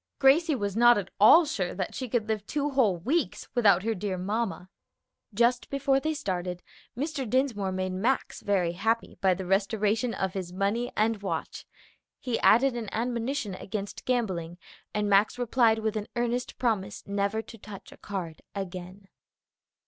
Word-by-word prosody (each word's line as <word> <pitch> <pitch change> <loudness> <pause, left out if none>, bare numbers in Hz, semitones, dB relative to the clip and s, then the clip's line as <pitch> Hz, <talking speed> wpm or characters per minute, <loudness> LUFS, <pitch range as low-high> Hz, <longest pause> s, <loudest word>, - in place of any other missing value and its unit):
Gracie 295 +3 +4
was 205 -5 -3
not 240 0 +6
at 195 -2 -4
all 315 +12 +8
sure 195 - -2
that 185 -1 -3
she 255 -2 -5
could 220 -2 0
live 215 -2 -1
two 290 0 -1
whole 230 -10 +3
weeks 280 - -1
without 200 -7 +4
her 225 +1 0
dear 195 -2 -3
mamma. 200 0 -2 0.6
Just 235 +3 +1
before 275 -1 +2
they 310 +2 -2
started, 180 - -3 0.3
Mr. 275 -3 -3
Dinsmore 225 -6 +1
made 185 0 -2
Max 225 +9 -1
very 185 -4 +1
happy 225 +6 -1
by 190 -2 +4
the 190 - -6
restoration 210 +4 +1
of 190 -1 -2
his 185 -3 -5
money 200 +6 -1
and 215 -1 +1
watch. 200 - -4 0.5
He 245 -3 -2
added 255 +3 +5
an 230 -4 -4
admonition 235 -1 -2
against 200 +2 -6
gambling, 185 -9 -1 0.3
and 210 0 -1
Max 205 +3 +3
replied 235 -2 +3
with 220 0 -2
an 215 -1 -3
earnest 240 +1 -2
promise 210 -5 -1
never 200 +2 -1
to 230 - -12
touch 200 -1 -11
a - - -14
card 175 -6 -6
again. 185 0 -7
215 Hz, 165 wpm, -28 LUFS, 195-245 Hz, 0.6 s, all